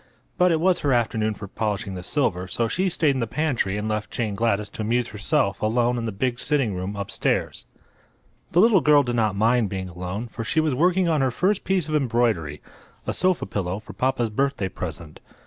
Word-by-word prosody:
But 180 0 +4
it 160 - +2
was 180 +2 +3
her 140 -2 +1
afternoon 110 -2 0
for 100 - -8
polishing 105 -1 -3
the 90 - -6
silver, 90 -4 -1
so 115 +5 -1
she 185 - 0
stayed 160 -4 +2
in 135 - -2
the 115 - -1
pantry 125 -8 -1
and 105 +1 -3
left 110 -1 -2
Jane 110 -4 -2
Gladys 105 -1 0
to - - -6
amuse 120 +2 0
herself 100 -1 0
alone 120 +3 +2
in 115 - -3
the 110 - -2
big 120 +4 -2
sitting 135 -7 +1
room 95 +2 -4
upstairs. 100 -1 -2 0.9
The 175 - +4
little 215 -4 +5
girl 145 +1 +5
did 120 -2 -2
not 110 -4 +1
mind 115 +1 +2
being 95 -1 -4
alone, 90 +6 -5
for 115 0 -6
she 160 - 0
was 155 -3 +1
working 180 +6 +2
on 155 -4 +2
her 135 - +2
first 185 - 0
piece 185 -5 0
of 155 - -4
embroidery—a 115 - -2
sofa 185 -1 +2
pillow 95 -2 -3
for 110 - -10
papa's 125 -3 0
birthday 135 -5 0
present. 85 -3 -7
115 Hz, 205 wpm, -24 LUFS, 100-145 Hz, 0.9 s, little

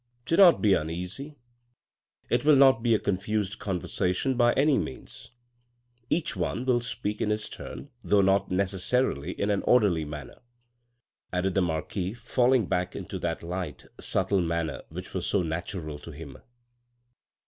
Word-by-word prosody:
" 120 0 -42
Do 165 - +1
not 180 -8 +7
be 105 -2 +5
uneasy. 90 - -3 0.9
It 120 0 +1
will 150 0 +6
not 135 -3 +6
be 115 -1 +3
a - - +1
confused 100 +1 -2
conversation 95 +5 -1
by 120 -1 +4
any 145 +1 +3
means. - - -7 0.8
Each 160 -7 0
one 95 +7 -2
will 125 -2 +3
speak 105 -3 -4
in - - +1
his 105 0 -1
turn, 145 - -9
though 105 -1 +4
not 95 0 +2
necessarily 95 - 0
in 100 +1 +1
an 100 - +1
orderly 100 -10 +4
manner," 75 -2 -9 0.9
added 90 +1 0
the 95 - +2
marquis 90 +4 -2
falling 125 0 +2
back 90 0 -1
into - - -6
that - - -3
light, 90 -2 -5
subtle 95 0 +1
manner 85 -2 -2
which - - -8
was - - -2
so 100 - +1
natural 80 -2 -4
to - - -11
him. 75 -3 -9
100 Hz, 155 wpm, -27 LUFS, 90-120 Hz, 0.9 s, not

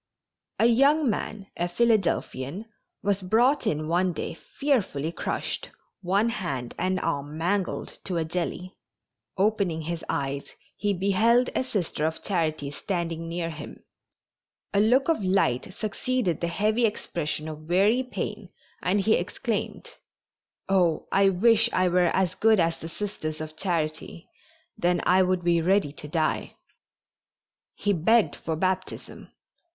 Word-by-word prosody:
A - - +3
young 275 +3 +4
man, 210 -1 -4
a 175 - -1
Philadelphian, 195 - 0 0.4
was 200 -1 +1
brought 235 +10 +2
in 155 0 -1
one 175 +2 +1
day - - -4
fearfully 185 - -1
crushed, - - -3 0.3
one 200 +5 +2
hand 140 - -3
and 185 0 0
arm 145 -2 -2
mangled 185 +3 -2
to 180 -3 -2
a 165 - 0
jelly. 180 +2 -4 0.6
Opening 195 -5 +1
his 170 +1 -4
eyes 140 0 -3 0.2
he 205 - 0
beheld 210 +6 +3
a - - +1
Sister 190 - -2
of 160 - -5
Charity 155 -6 -1
standing 165 0 -3
near 170 0 -2
him; 155 - -9 0.9
a 200 - +3
look 245 +6 +4
of 325 -10 +1
light 185 -7 +1
succeeded 215 - -1
the 170 - 0
heavy 215 +7 +1
expression 155 -7 -3
of 155 0 -8
weary 205 +8 +4
pain 255 - -5 0.3
and 195 +3 +2
he 220 +3 +3
exclaimed: - - -2 0.8
"Oh, 180 -4 +2
I 195 0 +5
wish 225 +4 +4
I 185 - +3
were 175 -1 +3
as 185 -2 +1
good 220 0 +4
as 165 -1 +1
the 165 - -7
Sisters 165 -5 -4
of 155 0 -6
Charity, 165 -2 -3 0.4
then 175 0 +1
I 185 +1 +5
would 185 -1 +1
be 170 -1 +3
ready 190 -3 +2
to 150 0 -10
die." 155 +1 -1 1.2
He 205 - 0
begged 215 +6 +3
for 160 - -3
baptism. 185 +2 -3
185 Hz, 140 wpm, -26 LUFS, 165-210 Hz, 1.2 s, I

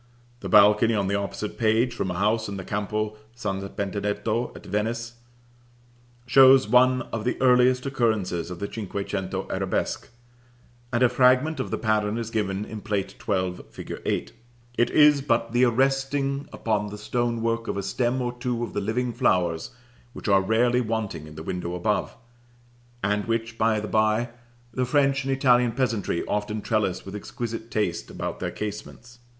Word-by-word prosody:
The 95 - -6
balcony, 105 +4 +6
on 100 -2 0
the - - 0
opposite 100 +1 -4
page, 115 +2 +2
from 100 -5 -2
a 90 - -3
house 110 +2 +1
in 100 - -5
the 95 - -6
Campo 105 +2 -2 0.2
St. 100 -4 -4
Benedetto 105 +3 -2
at - - -11
Venice, 115 +3 -2 1.1
shows 130 +1 +7
one 130 +1 +4
of 115 -2 -2
the 125 - -1
earliest 125 0 +4
occurrences 110 -11 0
of 90 - -6
the 100 - -3
cinque 100 -2 -5
cento 95 -1 -3
arabesque, - - -2 0.8
and 120 0 +2
a - - +7
fragment 130 +5 +3
of 130 - -2
the - - -2
pattern 110 -1 0
is 115 -1 -4
given 105 -2 -1
in 110 -1 -7
Plate 100 -2 -2
XII. 95 -3 -1
fig. - - -8
8. - - -2 0.4
It 120 - +2
is 150 -2 +5
but 115 -3 0
the 120 +2 +4
arresting 135 +3 0
upon 105 -2 -1
the 105 0 -7
stone 120 +2 -1
work 115 0 -1
of - - -2
a 100 - -2
stem 120 +5 0
or 120 0 -2
two 120 -1 -3
of 115 - -5
the 105 - -1
living 120 +4 -1
flowers, 90 -9 +1 0.4
which - - -8
are 100 -2 +5
rarely 120 +5 +2
wanting 105 -9 -3
in 75 - -12
the 80 - -7
window 90 0 -4
above 105 +5 -1 0.9
(and 105 +1 0
which, 115 0 -2
by 110 -1 +2
the 105 - -4
by, 110 +3 +2 0.4
the 130 - 0
French 135 +1 +2
and 135 - -1
Italian 125 -3 +3
peasantry 115 -8 -1
often 105 +1 -2
trellis 105 -5 -1
with 95 - -8
exquisite 115 +2 -5
taste 105 -8 -2
about - - -5
their - - -2
casements). 110 +3 -7
110 Hz, 170 wpm, -25 LUFS, 100-125 Hz, 1.1 s, shows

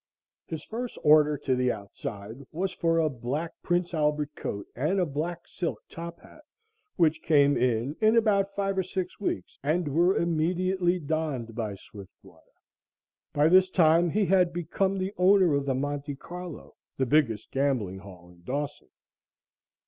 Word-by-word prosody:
His 160 -1 -5
first 240 +2 -5
order 150 0 +5
"to 135 -2 0
the 125 0 +1
outside" 105 +3 -7
was 185 +4 -2
for 165 -2 +1
a 160 -1 +3
black 140 +5 -3
Prince 175 0 0
Albert 150 -1 0
coat 100 0 -5
and 155 +10 0
a 180 - +2
black 165 +3 -4
silk 175 -3 -3
top 170 0 -8
hat, 310 - -16 0.5
which 160 -3 +2
came 145 -2 +4
in 125 +3 0
in 220 +1 +5
about 200 -3 +2
five 195 -1 0
or - - +4
six 185 0 -4
weeks 95 - -4
and 155 +4 0
were 175 +6 +3
immediately 175 +2 +1
donned 150 -7 -3
by 110 -3 -3
Swiftwater. 100 0 -15 0.9
By 145 +1 +3
this 185 +2 +5
time 170 -1 +4
he 205 +5 +1
had 180 -2 +3
become 175 +3 -1
the 190 +1 -2
owner 185 -2 +5
of 140 0 0
the 135 - +1
Monte 145 +1 -3
Carlo, 175 +3 -9 0.2
the 130 - +1
biggest 120 -6 +1
gambling 130 -9 0
hall 90 -2 -13
in 90 0 -19
Dawson. 145 +9 -4
155 Hz, 155 wpm, -27 LUFS, 135-180 Hz, 0.9 s, order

